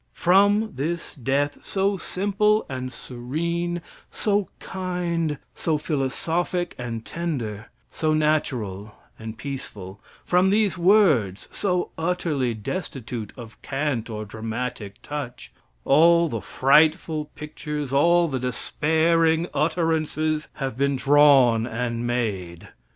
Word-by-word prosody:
From 205 +4 +4
this 165 +6 -3
death, 140 +2 -1
so 195 +1 0
simple 205 +4 +1
and 130 -2 -5
serene, 170 +9 -3 0.3
so 205 -2 0
kind, 175 -4 -2 0.2
so 160 -2 0
philosophic 165 +5 -1
and 115 -2 -5
tender; 120 -11 -4 0.2
so 155 -1 0
natural 120 -10 -1 0.2
and 110 0 -7
peaceful; 105 -8 -7 0.2
from 180 +2 +3
these 210 -1 +2
words 170 - +3
so 180 -3 -1
utterly 160 -8 0
destitute 115 - -5
of 115 -3 -11
cant 135 -5 -2
or 110 -1 -5
dramatic 110 -1 -5
touch, 145 -4 -6 0.3
all 170 +4 +5
the 115 -5 -3
frightful 155 - +3
pictures, 150 -2 -5
all 170 +4 +4
the 135 -4 -2
despairing 160 +6 +1
utterances 155 -1 0
have 135 -4 -4
been 140 +2 +1
drawn 135 -4 +5
and 120 0 -2
made. 100 -8 -3
150 Hz, 105 wpm, -24 LUFS, 120-170 Hz, 0.3 s, all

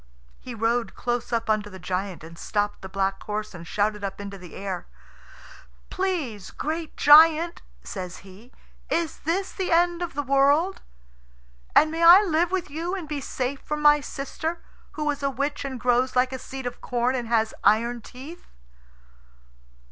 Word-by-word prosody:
He 245 - -8
rode 230 +1 0
close 240 0 -2
up 230 -1 -1
under 215 -1 0
the 190 - -10
giant, 185 -1 -4
and 165 +1 -11
stopped 205 +4 -2
the 190 - -8
black 195 0 -1
horse, 210 0 -4
and 170 -2 -10
shouted 210 +1 -1
up 195 0 -4
into 200 0 -6
the 180 -3 -11
air. 190 -2 -5 1.0
"Please, 310 - -2
great 320 +1 -4
giant," 320 +3 +6 0.2
says 185 -3 -6
he, 200 +6 -15 0.4
"is 335 -3 -1
this 370 +5 -1
the 375 -2 -3
end 345 +1 +3
of 345 -5 -4
the 290 - -1
world? 285 +7 +3 0.9
And 310 +1 +6
may 325 +1 -3
I 355 +5 +9
live 340 -2 +1
with 370 -2 -2
you 335 +5 -3
and 355 -5 -6
be 295 -2 -4
safe 265 +1 -3
from 300 0 -4
my 295 0 +7
sister, 315 +5 -5 0.3
who 300 -1 -3
is 285 0 -6
a 275 - +1
witch, 280 +3 -2
and 265 -2 -5
grows 250 +1 +1
like 255 +1 +2
a 260 - -4
seed 265 0 -8
of 245 - -5
corn, 245 +1 0
and 245 -3 -3
has 225 -1 +1
iron 230 +4 +3
teeth?" 275 +10 -11
260 Hz, 170 wpm, -25 LUFS, 210-315 Hz, 1.0 s, I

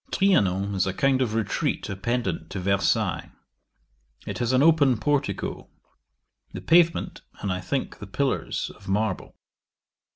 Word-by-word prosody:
'Trianon 100 - +2
is 95 -1 +1
a 95 - -2
kind 135 +2 +2
of 115 -4 0
retreat 110 -3 -1
appendant 95 -5 -2
to 95 - -5
Versailles. 100 +1 0 0.9
It - - -5
has 120 0 0
an 130 +2 +4
open 145 -6 +4
portico; 145 +6 -2 0.8
the - - -5
pavement, 170 0 +3 0.2
and, 100 -3 -2
I 90 - -4
think, 130 +9 -3
the 105 - -8
pillars, 135 +7 -2
of 100 - -17
marble. 105 0 -1
110 Hz, 135 wpm, -25 LUFS, 95-135 Hz, 0.9 s, an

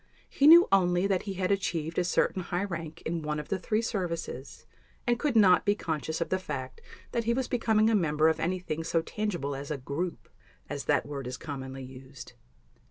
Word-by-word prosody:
He 280 - +3
knew 340 +3 +9
only 180 -1 +3
that 195 -2 +1
he 195 - -3
had 185 +1 0
achieved 165 -5 -1
a - - +2
certain 180 +1 +1
high 175 +1 -2
rank 165 -4 -6
in 165 0 -2
one 150 0 -2
of 150 - -8
the 195 - -1
three 215 +5 0
services, 170 - -4 0.4
and 240 -1 +1
could 285 -3 0
not 185 -6 +6
be 205 0 +2
conscious 160 -4 -3
of 170 - -2
the 185 - 0
fact 135 -7 -6 0.3
that 235 -1 -1
he 235 +1 +2
was 260 0 -1
becoming 220 -3 +2
a 225 - +3
member 160 -6 +3
of 160 - +2
anything 170 -2 -2
so 165 0 0
tangible 175 -11 -3
as 140 +1 -7
a 150 - -2
"group", 145 +7 -4 0.4
as - - -5
that - - +2
word 140 -3 -5
is 125 0 -5
commonly 135 -2 -6
used. 130 -2 -11
170 Hz, 205 wpm, -29 LUFS, 150-200 Hz, 0.4 s, knew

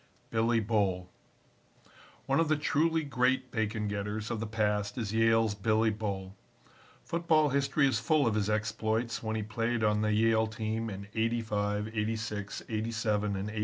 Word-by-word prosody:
Billy 115 +1 +2
Bull 100 -5 0 1.1
One 135 +2 +2
of 165 - +3
the 155 - +3
truly 160 +2 +1
great 130 -2 +1
bacon 110 -1 -1
getters 105 +1 -3
of 115 - -2
the 115 - -3
past 105 -1 -1
is 110 -4 -3
Yale's 115 -1 +3
Billy 110 +2 +2
Bull. 100 -3 -4 0.7
Football 165 -3 +2
history 140 +1 +2
is 135 - +1
full 155 -3 +2
of 115 - +2
his 105 -1 0
exploits 110 +2 -1
when 110 -1 -2
he 110 - -1
played 115 +2 -1
on 105 0 +2
the 105 0 +1
Yale 110 +1 +3
team 110 +1 -3
in 100 -1 -6
'85, 110 -2 -1
'86, 105 -2 -3
'87 110 -2 -1
and 100 +2 -3
'88. 110 - -4
110 Hz, 160 wpm, -30 LUFS, 105-115 Hz, 1.1 s, of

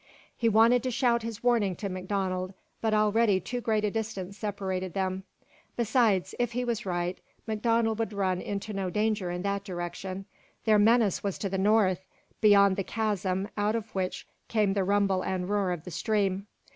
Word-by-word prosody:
He 230 - +2
wanted 225 +3 +5
to 255 - -2
shout 240 -1 +2
his 230 0 -6
warning 225 -6 +2
to 200 - -4
MacDonald, 185 0 -2 0.3
but 220 - +1
already 215 -1 +3
too 245 +7 -4
great 215 -2 +1
a 205 - 0
distance 200 -4 -4
separated 190 -4 -3
them. 190 0 -2 0.5
Besides, 225 -5 +2
if 240 -1 0
he 250 +1 -1
was 230 -4 -2
right, 175 0 -2 0.3
MacDonald 225 0 +1
would 225 -2 -1
run 190 -3 0
into 205 +1 -4
no 195 -2 -2
danger 210 -1 0
in 175 +1 -3
that 200 0 -1
direction. 185 +1 -5 0.4
Their 215 -2 +5
menace 220 -2 +3
was 200 -2 -2
to 195 - -3
the 190 0 -2
north 195 -2 +3 0.4
beyond 200 -2 +6
the 195 - 0
chasm 200 -3 -1
out 210 +1 +1
of 225 -1 -4
which 185 -1 -2 0.2
came 210 -3 +2
the 195 -1 +1
rumble 195 -1 +2
and 185 -1 -2
roar 200 -2 +1
of 175 -3 -4
the 180 - -8
stream. 200 -1 0
200 Hz, 180 wpm, -28 LUFS, 190-220 Hz, 0.5 s, beyond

